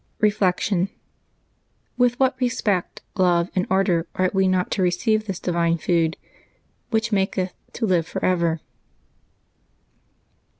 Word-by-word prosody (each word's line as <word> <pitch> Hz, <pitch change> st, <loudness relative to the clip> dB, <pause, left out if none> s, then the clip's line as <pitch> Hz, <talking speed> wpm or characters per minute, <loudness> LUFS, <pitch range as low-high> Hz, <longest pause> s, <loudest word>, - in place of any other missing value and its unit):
Reflection. 195 Hz, -2 st, +1 dB, 0.5 s
— -, -, -45 dB
With 245 Hz, 0 st, +2 dB
what 260 Hz, -1 st, +3 dB
respect, 210 Hz, -7 st, -1 dB
love, 175 Hz, -2 st, +2 dB
and 185 Hz, -, 0 dB
ardor 185 Hz, -3 st, +2 dB
ought 185 Hz, 0 st, +1 dB
we 190 Hz, -1 st, +3 dB
not 185 Hz, -1 st, +1 dB
to 200 Hz, -, 0 dB
receive 215 Hz, +5 st, +1 dB
this 195 Hz, -3 st, -4 dB
divine 170 Hz, -1 st, +1 dB
food, 165 Hz, 0 st, +1 dB, 0.7 s
"which 225 Hz, 0 st, 0 dB
maketh 190 Hz, -2 st, 0 dB, 0.2 s
to 230 Hz, -, -2 dB
live 175 Hz, -5 st, +1 dB
forever 170 Hz, -3 st, 0 dB
185 Hz, 120 wpm, -23 LUFS, 175-210 Hz, 0.7 s, what